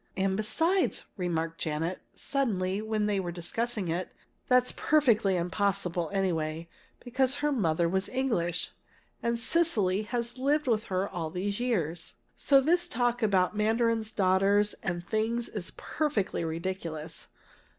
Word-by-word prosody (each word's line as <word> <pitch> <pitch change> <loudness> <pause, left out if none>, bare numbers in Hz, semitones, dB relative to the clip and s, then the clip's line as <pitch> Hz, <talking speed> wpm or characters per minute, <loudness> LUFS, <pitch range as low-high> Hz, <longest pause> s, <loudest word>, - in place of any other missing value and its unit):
"And 190 0 +1
besides," 325 - +1
remarked 165 -3 -2
Janet, 165 +3 -2 0.2
suddenly, 205 -8 -1
when 215 -1 -1
they 205 -2 +1
were 175 -2 -3
discussing 205 +4 -2
it, 170 +2 -2 0.4
"that's 250 0 +4
perfectly 230 -11 +3
impossible, 180 -1 0
anyway, 165 -4 -1 0.3
because 260 +2 +1
her 295 +1 0
mother 170 - +1
was 190 +2 0
English, 220 -11 -1 0.5
and 235 0 0
Cecily 230 - +2
has 235 +2 -3
lived 295 +3 +2
with 225 -3 +1
her 190 0 -1
all 165 -4 -4
these 195 +5 -2
years. 175 -10 -2 0.2
So 275 -1 +4
this 350 +6 +2
talk 245 -4 0
about 195 -2 +2
mandarin's 225 +1 +1
daughters 200 +2 +3
and 175 -1 -3
things 230 +2 0
is 195 -5 -5
perfectly 285 - -1
ridiculous!" 165 - -4
205 Hz, 130 wpm, -29 LUFS, 175-240 Hz, 0.5 s, that's